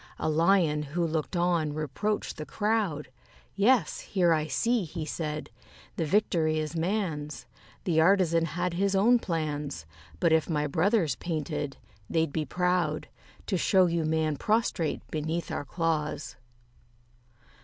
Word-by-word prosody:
A - - -1
Lion 165 -1 +3
who 155 +4 -2
looked 160 +2 -2
on 170 -4 +1
reproached 155 +8 -2
the 155 - -5
crowd: 205 -10 -1 0.5
"Yes, 230 +4 +3
here 175 -4 +2
I 155 -1 0
see," 230 - +1
he 165 -1 -5
said, 155 -1 -4 0.4
"the 165 - -1
victory 160 -3 +2
is 155 +1 -3
man's: 165 -4 -2 0.4
The 160 -3 +2
artisan 170 -2 +4
had 175 +2 -2
his 195 +2 +1
own 235 +5 +5
plans; 150 - -3 0.3
But 160 - +3
if 160 +1 +2
my 150 -2 0
brothers 165 +3 +1
painted, 150 -4 -3 0.3
they'd 160 -3 0
be 155 -2 -1
proud 180 0 0 0.4
To 190 - 0
show 185 +1 +4
you 170 -1 0
man 155 -1 0
prostrate 215 -7 0
beneath 160 +2 -2
our - - -3
claws." 155 -1 -2
165 Hz, 135 wpm, -28 LUFS, 155-185 Hz, 0.5 s, own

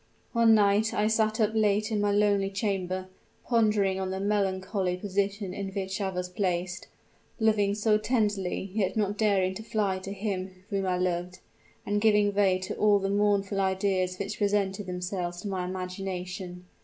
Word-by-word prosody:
"One 230 -2 +5
night 210 +1 +3
I 210 - +2
sat 220 0 +1
up 215 -1 +3
late 215 0 +2
in 210 -1 +1
my 205 0 +2
lonely 200 -1 +2
chamber 190 -2 -2 0.4
pondering 210 -5 +2
on 190 -1 -2
the 190 0 -3
melancholy 190 -2 0
position 200 0 -2
in 195 -1 -4
which 190 0 -4
I 195 - 0
was 180 -1 -3
placed, 180 -1 -2 0.5
loving 210 -2 +2
so 215 0 +2
tenderly, 205 -5 -1
yet 195 -2 0
not 205 -1 +1
daring 200 -3 +2
to 220 - -7
fly 210 -4 -1
to 190 +1 -7
him 190 -2 -4
whom 195 -1 0
I 180 -1 +1
loved, 180 0 -2 0.5
and 205 0 0
giving 210 -2 +4
way 195 -2 +3
to 185 0 -5
all 210 -1 +4
the 195 0 -1
mournful 200 -1 +1
ideas 190 -1 0
which 200 +1 -4
presented 200 -1 0
themselves 180 -1 -3
to - - -4
my 185 -2 -2
imagination. 185 0 -5
195 Hz, 170 wpm, -28 LUFS, 185-210 Hz, 0.5 s, One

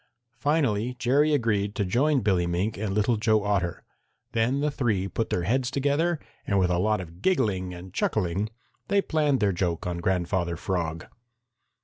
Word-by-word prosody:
Finally 125 -5 +1
Jerry 140 +6 +3
agreed 105 -7 +1
to 100 - 0
join 135 +8 +2
Billy 95 -4 +2
Mink 90 +5 -1
and 105 -1 -3
Little 105 +3 +2
Joe 110 -1 +2
Otter. 95 -3 -1 0.5
Then 120 +5 +1
the 150 0 +1
three 110 -9 0
put 110 +4 -2
their 90 - 0
heads 125 +6 +1
together 145 +5 +1 0.3
and 100 - +2
with 90 -2 +2
a 90 - +1
lot 105 +2 +2
of 85 0 -9
giggling 105 - +1
and 90 +1 -10
chuckling 100 +1 0 0.4
they 200 0 +3
planned 150 -4 +1
their 100 -2 +3
joke 85 -2 -1
on 90 -1 -2
Grandfather 85 -1 0
Frog. 85 -2 -2
105 Hz, 165 wpm, -26 LUFS, 90-130 Hz, 0.5 s, Jerry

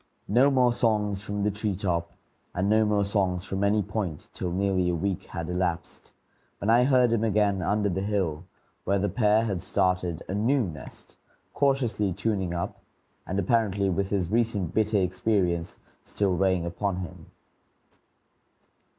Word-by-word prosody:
No 125 +7 +4
more 125 -3 +3
songs 105 -4 0
from 105 -1 -3
the 105 - +2
tree 105 0 -2
top, 85 -3 -2 0.4
and 95 +2 0
no 110 +1 +4
more 105 -1 +2
songs 95 -3 0
from 95 +1 -2
any 105 +1 +2
point, 95 -6 -4
till 90 - -3
nearly 95 -1 +1
a 90 - 0
week 95 +2 -2
had 85 -2 -6
elapsed, 90 -1 -3 0.5
when 100 - 0
I 120 +2 +5
heard 125 -3 +4
him 115 -1 +1
again 105 -3 +2
under 105 +3 +1
the 95 0 -1
hill, 95 -5 -1 0.4
where 100 - +1
the 100 +1 0
pair 105 +2 +3
had 95 -5 -2
started 90 -3 0
a - - -4
new 120 +6 +2
nest, 75 -9 -9 0.4
cautiously 120 -9 +1
tuning 95 -3 -1
up, 85 - -4 0.5
and 95 - -2
apparently 100 -1 +1
with 95 +2 -1
his 95 -4 -1
recent 110 -6 0
bitter 110 -1 +2
experience 90 -2 0 0.3
still 100 -3 0
weighing 95 -2 +1
upon 95 +2 -2
him. 90 -2 -9
100 Hz, 160 wpm, -27 LUFS, 90-105 Hz, 0.5 s, I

